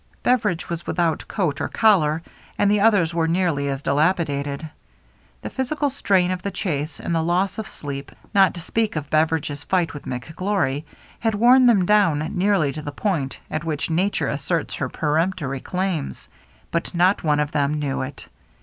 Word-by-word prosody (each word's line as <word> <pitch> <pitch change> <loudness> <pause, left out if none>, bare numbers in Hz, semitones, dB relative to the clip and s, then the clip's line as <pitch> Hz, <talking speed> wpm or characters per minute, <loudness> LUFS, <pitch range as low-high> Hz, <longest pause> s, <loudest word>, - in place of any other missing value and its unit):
Beveridge 215 -9 +1
was 170 -1 -5
without 165 -3 0
coat 165 -9 -1
or - - 0
collar, 165 -8 +3 0.3
and 205 0 +3
the 210 - +3
others 200 -6 +3
were 165 -1 +1
nearly 165 -5 +1
as 135 0 -3
dilapidated. 145 -1 0 0.8
The - - -5
physi 265 +3 -2
cal 290 -2 +1
strain 190 -9 +2
of 185 -1 -3
the 200 - -2
chase, 155 -6 -3
and - - -3
the 165 - +2
loss 185 +5 0
of 220 - -4
sleep, 140 -1 -7 0.2
not 195 -2 +5
to 170 - -6
speak 220 +4 -1
of 150 -2 -4
Beveridge's 155 -2 +1
fight 180 -2 0
with 145 - -9
McGlory, 150 - -2 0.3
had 225 -2 0
worn 245 +4 +6
them 205 -7 +4
down 165 -7 +3
nearly 180 -7 +2
to 155 - -6
the 145 - -5
point 145 -5 -2
at 155 +1 -2
which 160 0 -2
nature 170 -3 +1
asserts 145 +4 -2
her 130 - -3
peremptory 155 -2 -1
claims, 180 -2 -3 0.2
— - - -32
but 170 +2 -2
not 180 +3 +3
one 150 -2 +2
of 150 0 0
them 145 0 +1
knew 145 -3 -2
it. 130 +1 -7
165 Hz, 180 wpm, -22 LUFS, 145-195 Hz, 0.8 s, worn